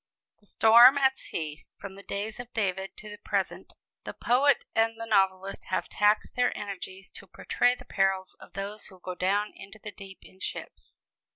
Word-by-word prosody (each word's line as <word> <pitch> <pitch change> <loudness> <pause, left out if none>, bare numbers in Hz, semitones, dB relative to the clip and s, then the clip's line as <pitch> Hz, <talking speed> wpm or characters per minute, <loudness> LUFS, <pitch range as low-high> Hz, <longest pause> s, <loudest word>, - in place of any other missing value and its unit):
The 205 - -17
Storm 235 +7 +7
at 265 -1 +3
Sea! 155 - -6
From 200 -1 -8
the 195 - -11
days 205 +3 -4
of 245 0 -8
David 190 -3 -2
to 215 - -10
the 210 - -10
present, - - -3 0.3
the - - -7
poet 270 +3 +3
and 225 0 +1
the 230 - -4
novelist 190 -2 +1
have 185 - -2
taxed 210 +1 +2
their 245 0 +1
energies 195 -1 -7
to - - -12
portray 245 0 +1
the - - -14
perils 195 -1 0
of - - -15
those 200 +2 -5
who 190 -2 -15
go 180 0 -6
down 200 +4 0
into 195 +2 -12
the 215 -1 -9
deep 195 -2 -12
in 190 - -18
ships. - - -7
200 Hz, 185 wpm, -28 LUFS, 190-225 Hz, 0.3 s, Storm